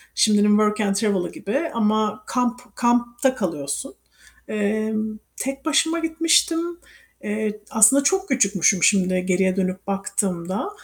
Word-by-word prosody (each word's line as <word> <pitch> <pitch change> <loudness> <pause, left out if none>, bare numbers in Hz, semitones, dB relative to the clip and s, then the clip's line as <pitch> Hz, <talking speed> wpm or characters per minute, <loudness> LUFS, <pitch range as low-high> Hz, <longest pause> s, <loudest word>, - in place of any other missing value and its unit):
Şimdinin 210 -1 +3
Work 210 +1 +2
and 200 -1 0
Travel'ı 200 -4 0
gibi 280 +11 -3
ama 215 -1 0
kamp 245 0 -3
kampta 240 +2 +1
kalıyorsun. 170 - -4 0.5
Eee, 215 +1 -1 0.4
tek 270 +1 -5
başıma 320 +2 +1
gitmiştim. 330 0 +2 0.6
Eee, 210 0 -3
aslında 225 +6 +6
çok 385 +5 +1
küçükmüşüm 195 - +2
şimdi 185 -2 +2
geriye 185 0 +1
dönüp 190 0 -3
baktığımda 195 - -2
215 Hz, 115 wpm, -22 LUFS, 195-250 Hz, 0.6 s, aslında